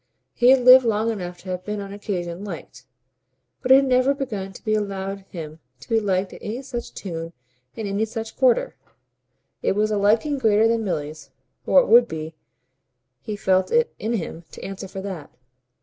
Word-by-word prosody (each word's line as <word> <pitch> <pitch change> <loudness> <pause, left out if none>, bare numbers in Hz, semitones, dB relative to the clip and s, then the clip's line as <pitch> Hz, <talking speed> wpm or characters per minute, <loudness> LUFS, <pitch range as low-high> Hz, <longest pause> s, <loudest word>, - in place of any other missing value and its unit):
He 245 0 +4
had 265 -1 +6
lived 255 +1 +9
long 225 0 +1
enough 180 -4 -5
to 185 - -10
have 180 0 -4
been 210 +1 -4
on 200 0 -7
occasion 185 -3 -4
"liked," 205 - -9 0.8
but 255 - 0
it - - +11
had 275 0 +5
never 255 +1 +3
begun 210 -9 -4
to 190 - -14
be 215 - +1
allowed 195 -2 -2
him 160 -2 -8 0.2
to 140 - -14
be 225 - +2
liked 190 -2 -1
to - - -12
any 235 +6 -5
such 240 -3 -6
tune 165 -3 -6 0.4
in 220 - -5
any 200 +2 0
such 225 0 -6
quarter. - - +2 0.9
It - - +1
was 215 +2 +1
a 210 - +1
liking 225 +8 +2
greater 220 -2 +4
than 230 0 +1
Milly's 155 -5 -4 0.4
or 275 - +6
it - - -3
would 235 +2 +7
be: 160 -2 -6 0.9
he 215 - -5
felt 190 -2 +1
it 475 0 +2
in 225 +2 -2
him 170 -5 -4
to - - -10
answer 195 0 -6
for 190 +1 -7
that. 185 -7 -6
210 Hz, 195 wpm, -23 LUFS, 190-235 Hz, 0.9 s, it